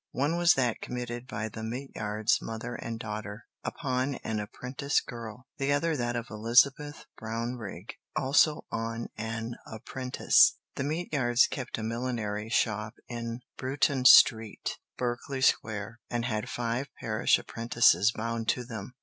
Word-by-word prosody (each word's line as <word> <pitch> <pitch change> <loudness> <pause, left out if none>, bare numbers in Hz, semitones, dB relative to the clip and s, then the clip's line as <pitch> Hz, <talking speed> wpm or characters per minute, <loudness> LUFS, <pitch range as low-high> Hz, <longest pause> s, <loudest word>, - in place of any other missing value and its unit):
One 145 +6 +1
was 175 0 +5
that 125 -4 0
committed 120 0 -5
by 110 -4 -3
the 110 +1 -8
Meteyards, 110 -2 -1
mother 115 +2 -5
and 115 -1 -5
daughter, 105 0 -6 0.2
upon 130 -2 -1
an 110 -1 -2
apprentice 125 +7 -1
girl; 115 0 -8
the 135 +1 +1
other 155 +3 +2
that 120 -3 -1
of 120 -1 -2
Elizabeth 135 +7 +2
Brownrigg, 115 -3 -5 0.2
also 145 +3 +3
on 115 +1 -3
an 115 +1 -4
apprentice. 125 +3 +3 0.2
The - - -3
Meteyards 145 -6 +2
kept 130 -3 -4
a 110 - -4
millinery 110 -2 -3
shop 105 -1 0
in 115 0 -5 0.2
Bruton 135 0 0
Street, 115 -4 +6 0.2
Berkeley 125 +2 -3
Square, 110 -2 +1
and 120 -1 -1
had 110 -4 -2
five 120 +3 -2
parish 110 0 +2
apprentices 115 -4 +3
bound 115 0 -3
to 125 - +1
them. 115 0 -8
120 Hz, 135 wpm, -29 LUFS, 110-130 Hz, 0.2 s, Street